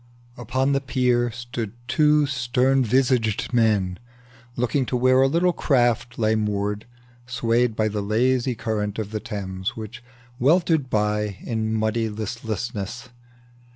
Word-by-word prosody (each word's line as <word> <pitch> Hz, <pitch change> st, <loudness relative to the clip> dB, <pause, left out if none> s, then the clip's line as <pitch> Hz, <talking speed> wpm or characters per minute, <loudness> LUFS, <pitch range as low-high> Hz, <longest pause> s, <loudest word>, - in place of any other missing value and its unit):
Upon 130 Hz, +3 st, -1 dB
the 140 Hz, 0 st, +1 dB
pier 125 Hz, -2 st, +1 dB
stood 120 Hz, -2 st, -6 dB
two 150 Hz, +3 st, +4 dB
stern 130 Hz, 0 st, +1 dB
visaged 125 Hz, -2 st, +1 dB
men, 105 Hz, -6 st, +2 dB, 0.6 s
Looking 125 Hz, +3 st, 0 dB
to 125 Hz, -, 0 dB
where 130 Hz, +1 st, +4 dB
a 135 Hz, -, +5 dB
little 170 Hz, +5 st, +2 dB
craft 120 Hz, -4 st, +1 dB
lay 110 Hz, -1 st, +2 dB
moored, 105 Hz, -1 st, -1 dB, 0.4 s
Swayed 120 Hz, -1 st, +1 dB
by 110 Hz, 0 st, +1 dB
the 105 Hz, -1 st, -2 dB
lazy 125 Hz, +4 st, +1 dB
current 110 Hz, -2 st, -2 dB
of 105 Hz, -2 st, -4 dB
the 110 Hz, -, -2 dB
Thames, 95 Hz, -4 st, -5 dB
Which 115 Hz, +2 st, -8 dB, 0.4 s
weltered 160 Hz, 0 st, +3 dB
by 105 Hz, -2 st, 0 dB
in 110 Hz, -1 st, -2 dB
muddy 110 Hz, +1 st, 0 dB
listlessness. 110 Hz, +1 st, -5 dB
115 Hz, 130 wpm, -23 LUFS, 110-130 Hz, 0.6 s, a